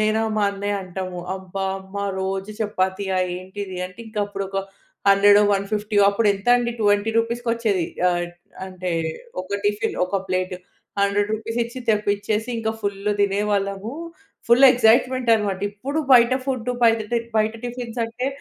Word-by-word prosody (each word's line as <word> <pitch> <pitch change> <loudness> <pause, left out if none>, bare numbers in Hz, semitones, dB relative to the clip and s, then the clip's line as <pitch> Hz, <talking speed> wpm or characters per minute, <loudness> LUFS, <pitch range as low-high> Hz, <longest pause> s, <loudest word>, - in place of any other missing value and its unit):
నేనా, 215 +1 +2
మా 210 - +2
అన్నయ్య 200 +1 -2
అంటాము. 185 -1 -5 0.2
"అబ్బా! 190 +1 -5 0.2
అమ్మా 195 +1 -5 0.2
రోజూ 195 +2 -3
చపాతీయా 190 -2 -1 0.2
ఏంటిది?" 190 +1 -7
అంటే, 185 0 -17
ఇంక 215 - -14
అప్పుడొక 195 -1 -5 0.5
హండ్రెడో, 205 +1 +6
వన్ 200 0 0
ఫిఫ్టీయో 210 -1 +2
అప్పుడెంతండి, 230 +4 +2
20 205 +1 +2
రూపీస్‌కొచ్చేది. 230 -5 0 0.2
ఆహ్, 175 0 -1 0.4
అంటే, 185 -1 -4 0.5
ఒక 200 +2 -3
టిఫిన్, 205 0 0
ఒక 185 +2 -2
ప్లేట్. 185 0 -1 0.5
100 200 +1 +2
రూపీసిచ్చి 230 +3 -3
తెప్పిచ్చేసి, 210 +1 0
ఇంక 220 -1 -1
ఫుల్లు 200 +1 -1
తినేవాళ్ళము. 200 +1 0 0.5
ఫుల్ 240 +3 +6
ఎక్సైట్‌‌మెంటనమాట. 230 -3 +3
ఇప్పుడు 260 +9 -4
బయట 235 0 +7
ఫుడ్డు 250 -3 -1
బయట 225 -1 +4
టిన్ 235 -1 -1
బయట 215 0 +2
టిఫిన్సంటే 240 0 -4
205 Hz, 125 wpm, -22 LUFS, 195-230 Hz, 0.5 s, బయట